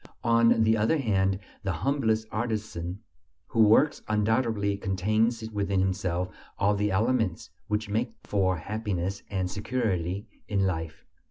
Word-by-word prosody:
On 115 -1 +4
the 110 0 +4
other 110 +9 +2
hand, 95 -7 +1 0.2
the 95 - -1
humblest 110 - 0
artisan 105 -5 -3 0.4
who 115 - -4
"works" 110 +8 +5
undoubtedly 110 -1 +1
contains 110 +4 0
within 100 -2 0
himself 90 -1 0 0.3
all 100 +1 +3
the 105 0 0
elements 110 -2 0 0.2
which 105 +1 -1
make 110 +3 -1
for 95 -3 +1
happiness 100 +1 -3
and 95 -2 -2
security 100 -4 -1 0.2
in 100 -2 +1
life. 80 -3 -3
105 Hz, 125 wpm, -28 LUFS, 95-110 Hz, 0.4 s, works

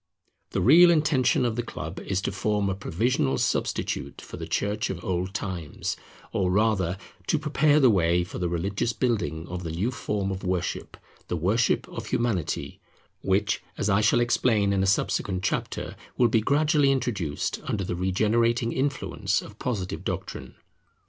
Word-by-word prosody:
The - - -1
real 170 +8 +8
intention 150 -6 +3
of 115 -2 0
the 120 - 0
Club 120 - -6
is 95 -1 -2
to - - -2
form 105 -2 0
a - - -2
provisional 95 - 0
substitute 70 +2 -1
for - - -9
the - - -6
Church 105 +1 -1
of 90 -2 -5
old 95 +1 -2
times, 90 -7 -3 0.4
or 95 -2 +1
rather 95 -3 +1 0.3
to - - +2
prepare 150 0 +3
the 130 -5 +6
way 85 -2 +3
for 90 - -7
the 90 -1 0
religious 100 +7 -1
building 110 -10 -1
of 90 +1 -5
the 85 - -5
new 90 +10 -1
form 100 -5 -2
of 95 0 -5
worship, 90 -1 -2 0.3
the - - -2
worship 105 +9 +1
of - - -7
Humanity; 110 -9 -1 0.4
which, 100 +2 +1 0.2
as 105 - 0
I 100 +2 +4
shall 105 +3 +4
explain 110 -4 +2
in 95 - +1
a 95 - +1
subsequent 95 -1 0
chapter, - - -2 0.2
will 120 -2 +4
be 110 0 +3
gradually 145 +2 +3
introduced 100 - -1
under 100 - -1
the 90 - -3
regenerating 115 +6 +1
influence 130 -7 -1
of 105 +1 -13
Positive 100 -7 -3
doctrine. - - -5
105 Hz, 165 wpm, -26 LUFS, 90-120 Hz, 0.4 s, real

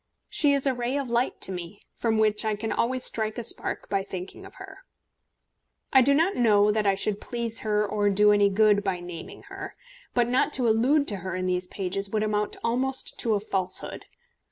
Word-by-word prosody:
She 290 -2 +3
is 280 -1 +2
a 270 - +2
ray 245 +2 -2
of 270 -4 -4
light 240 +2 0
to - - 0
me, 180 +2 -7
from 225 -2 -1
which 215 -1 +2
I 215 -1 0
can 220 +2 -4
always 255 +1 -1
strike 220 0 0
a 240 - -3
spark 230 - -1
by 195 -1 0
thinking 195 - -8
of 385 - -17
her. - - -11 1.1
I 265 - +7
do 280 +3 +3
not 335 +6 +2
know 210 -3 +4
that 210 -1 0
I 195 - +3
should 205 +1 -2
please 235 -2 -3
her 210 -1 0
or 205 0 0
do 210 +1 +4
any 205 -1 +4
good 205 0 +3
by 190 -3 -2
naming 175 -2 -9
her. 390 -1 -9 0.4
But 240 -1 +3
not 250 +2 +1
to 250 -3 +2
allude 260 +7 +2
to 205 - -4
her 185 +1 -5
in 185 0 -3
these 180 0 -1
pages 195 +1 -3
would 215 +1 -1
amount 210 -1 -1
almost 260 +3 0
to 225 -2 +1
a - - 0
falsehood. 190 -3 -2
215 Hz, 210 wpm, -26 LUFS, 200-245 Hz, 1.1 s, I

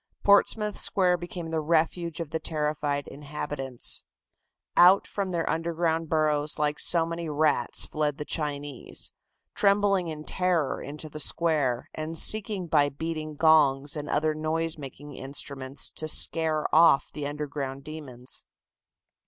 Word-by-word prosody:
Portsmouth 210 +1 +3
Square 180 -2 +2
became 175 -1 -7
the 160 - 0
refuge 165 +1 0
of 165 -3 -5
the 160 - -1
terrified 150 -2 -2
inhabitants. 140 -2 -2 0.7
Out 180 +3 +7
from 200 -2 -3
their 170 -2 -2
underground 165 0 -1
burrows 150 -1 +1
like 150 0 0
so 170 -2 +2
many 165 0 -4
rats 150 0 +2
fled 150 -2 -2
the 150 - -5
Chinese, 145 -4 -4 0.4
trembling 200 -2 +2
in 155 -1 -6
terror 180 -4 0
into 150 +2 -7
the 155 0 -8
square, 150 -6 +2
and 155 +1 -4
seeking 205 0 +2
by 145 -3 +3
beating 155 +1 -5
gongs 150 -2 +4
and 150 -1 -5
other 155 +1 +1
noise 160 +1 0
making 145 0 -10
instruments 135 0 -5
to 155 - -4
scare 155 0 +2
off 160 -3 +5
the 145 -1 -4
underground 145 -2 -5
demons. 135 -5 -5
155 Hz, 135 wpm, -27 LUFS, 145-165 Hz, 0.7 s, Out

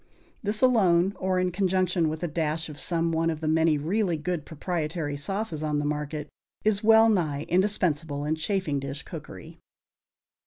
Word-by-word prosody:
This 215 +3 -1
alone 195 -7 +4
or 185 0 0
in 180 0 +1
conjunction 185 -2 +1
with 155 +2 -5
a - - +1
dash 160 0 -2
of 150 -1 -8
some 165 -1 0
one 165 0 +1
of 160 -2 -2
the 155 - -3
many 160 0 +3
really 175 +3 0
good 160 0 -3
proprietary 160 -2 -3
sauces 195 +1 -3
on 150 -1 0
the 145 - -1
market 150 0 -3 0.4
is 215 0 +2
well 225 +1 +7
nigh 155 -9 +1
indispensable 160 -6 +1
in 150 - +1
chafing 160 -2 -1
dish 140 +1 -6
cookery. - - -10
165 Hz, 165 wpm, -27 LUFS, 150-190 Hz, 0.4 s, well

